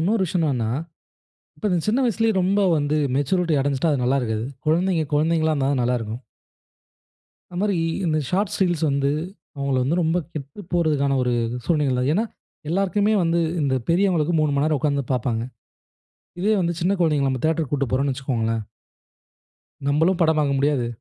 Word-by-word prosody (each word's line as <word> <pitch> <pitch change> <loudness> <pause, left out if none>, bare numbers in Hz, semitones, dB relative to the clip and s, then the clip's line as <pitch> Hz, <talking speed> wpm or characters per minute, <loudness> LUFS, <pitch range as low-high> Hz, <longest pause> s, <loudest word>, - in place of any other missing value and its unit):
இன்னொரு 195 +5 +1
விஷயம் 170 -1 0
என்னன்னா, 120 -6 0 0.9
இப்ப 215 - -4
இந்த 180 - +2
சின்ன 235 +5 +2
வயசுலயே 225 -1 +1
ரொம்ப 195 +3 +2 0.2
வந்து 145 0 0 0.2
மெச்சூரிட்டி 165 +4 +1
அடைஞ்சுட்டா 140 +3 0
அது 135 -3 0
நல்லா 135 +3 +2
இருக்காது. 110 0 -2 0.2
குழந்தைங்க 170 0 +2
குழந்தைங்களா 160 +1 +2
இருந்தா 135 -2 0
தான் 130 -3 0
நல்லா 125 +1 +1
இருக்கும். 115 +3 -6 1.3
அது 175 - -7
மாரி 200 0 +1 0.3
இந்த 155 -1 +1
ஷார்ட்ஸ், 200 +2 0
ரீல்ஸ் 175 -3 0
வந்து, 140 0 +1 0.5
அவங்களை 140 -1 0
வந்து 160 +6 0
ரொம்ப 165 +2 +1 0.2
கெட்டு 140 +6 -7
போறதுக்கான 150 -5 +1
ஒரு 125 -1 0 0.3
சூழ்நிலைகள். 140 -5 +1
ஏன்னா, 215 +7 +1 0.4
எல்லாருக்குமே 195 +4 +1
வந்து 165 0 +1 0.2
இந்த 135 -2 +1
பெரியவங்களுக்கு 175 -2 +2
3 155 -1 +2
மணி 140 - +2
நேரம் 155 -1 +1
உக்காந்து 140 -3 0
பாப்பாங்க. 115 -2 -1 1.0
இதே 210 +4 +2
வந்து 170 -1 0
சின்ன 185 - +2
குழந்தைகளை, 150 -5 +2
நம்ம 130 -1 -3
தேட்டருக்கு 160 -3 0
கூட்டு 140 -2 -1
போறோம்ன்னு 135 +1 +1
வச்சுக்கோங்களேன் 115 -4 -2 1.2
நம்மளும் 165 +6 +2
படம் 160 -1 +3
பாக்க 145 -2 +1
முடியாது. 140 -4 +1
150 Hz, 160 wpm, -23 LUFS, 135-175 Hz, 1.3 s, படம்